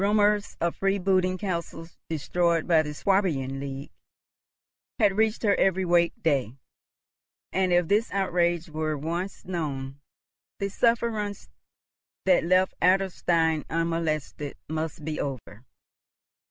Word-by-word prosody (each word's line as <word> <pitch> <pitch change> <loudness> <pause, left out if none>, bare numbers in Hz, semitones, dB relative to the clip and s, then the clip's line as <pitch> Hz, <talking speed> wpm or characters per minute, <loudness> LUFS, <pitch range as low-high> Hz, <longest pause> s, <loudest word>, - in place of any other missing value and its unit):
Rumours 205 0 +2
of 170 0 -1
freebooting 190 -1 +1
castles 170 -3 -5
destroyed 165 +1 0
by 165 -3 +5
the 150 -1 -5
Swabian 150 -7 0
League 140 0 -6 1.1
had 205 -5 +3
reached 220 +2 +1
her 205 -2 +4
every 190 0 +2
wake 170 -1 +2
day, 135 -6 0 0.9
and, 190 -1 +1
if 175 -1 +3
this 210 +5 +2
outrage 175 -3 +1
were 155 -1 -2
once 170 +6 -4
known, 140 -6 -4 0.6
the 200 - -2
sufferance 220 -2 0 0.7
that 185 -3 +4
left 185 +2 +3
Adlerstein 175 -4 +2
unmolested 160 -3 -2
must 155 0 -4
be 155 -1 -3
over. 125 -4 -6
170 Hz, 115 wpm, -26 LUFS, 155-195 Hz, 1.1 s, by